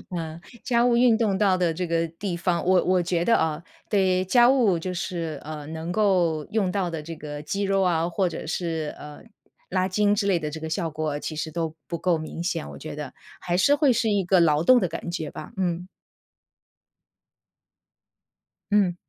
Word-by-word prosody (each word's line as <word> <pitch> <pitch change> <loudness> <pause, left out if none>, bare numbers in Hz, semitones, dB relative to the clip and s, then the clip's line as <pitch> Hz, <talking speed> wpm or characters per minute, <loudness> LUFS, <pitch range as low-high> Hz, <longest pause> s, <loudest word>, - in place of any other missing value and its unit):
嗯， 165 -1 -5 0.2
家 240 -1 +2
务 240 -1 +3
运 240 -2 +5
动 210 -5 +1
到 195 -3 +3
的 175 -2 +1
这 180 +1 -3
个 165 0 0
地 175 +2 -5
方， 175 0 0
我 185 0 +4
我 185 -1 +3
觉 175 0 -1
得 230 - +4
啊， 160 +1 0 0.3
对， 185 -2 +2
家 240 +5 +5
务 230 -10 +3
就 180 +2 -4
是， 170 -5 -4
嗯， 155 0 -7
能 160 +2 -4
够 180 -7 +2
用 200 -4 +1
到 190 -2 -1
的 165 -2 -4
这 165 +2 -7
个 150 -1 -7
肌 200 +6 -3
肉 195 0 +2
啊， 170 -2 +2
或 180 +1 0
者 165 - -6
是， 160 -2 -3
嗯， 150 0 -11 0.4
拉 185 0 +1
筋 205 +2 +2
之 200 -1 0
类 185 -3 +3
的 150 -2 -4
这 160 - -6
个 160 0 -5
效 165 -1 -2
果 155 -1 -2
其 155 - -5
实 155 +1 -4
都 160 -1 -3
不 170 - -3
够 175 -2 +1
明 160 +2 -6
显。 70 - -2
我 70 - -9
觉 - - -7
得 - - -6 0.3
还 175 0 -1
是 280 +9 +4
会 290 -3 +4
是 225 -1 +1
一 200 -2 +2
个 180 +1 +3
劳 155 -1 +3
动 250 +5 +6
的 185 - 0
感 165 +1 -6
觉 160 -4 -4
吧， 155 - -9
嗯。 180 -1 -1 2.8
嗯。 195 -4 +3
175 Hz, 215 characters per minute, -25 LUFS, 160-195 Hz, 2.8 s, 动